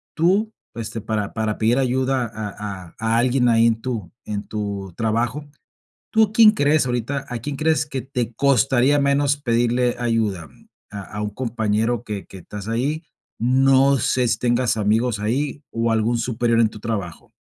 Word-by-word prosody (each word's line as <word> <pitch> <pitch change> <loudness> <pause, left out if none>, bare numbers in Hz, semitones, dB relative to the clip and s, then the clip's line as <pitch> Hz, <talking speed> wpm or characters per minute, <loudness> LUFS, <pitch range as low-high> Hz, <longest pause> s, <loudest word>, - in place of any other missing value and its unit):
tú, 195 +7 +2 0.2
este, 115 0 -5
para 105 -1 -3
para 110 -1 -2
pedir 115 +3 +2
ayuda 130 0 +1
a 105 -4 -6
a - - -27
a 110 +1 +1
alguien 125 +1 +3
ahí 115 0 +5
en 115 -1 0
tu 110 -9 -4
en 105 -1 -4
tu 100 -3 -4
trabajo. 115 +5 -1 0.7
¿Tú 220 -2 +3
quién 220 -1 +8
crees 150 - +2
ahorita 125 +3 -2
a 120 -1 -4
quién 140 +5 -5
crees 155 0 +1
que 135 -3 -4
te 125 -2 -3
costaría 135 +2 +3
menos 140 0 +2
pedirle 120 -1 +1
ayuda? 110 -9 -1 0.4
¿A 100 -1 -6
a 105 +2 -7
un 105 - -2
compañero 115 0 -1
que 105 -4 -5
que - - -12
estás 100 +3 -9
ahí? 140 +8 -1 0.4
No 135 +3 +4
sé 125 0 +1
si - - 0
tengas 120 -1 +1
amigos 110 +2 +1
ahí 135 +7 -2
o, 115 0 0
¿algún 115 +2 +1
superior 115 0 0
en 110 - +3
tu 110 - -11
trabajo? 100 -6 -5
120 Hz, 170 wpm, -22 LUFS, 110-135 Hz, 0.7 s, quién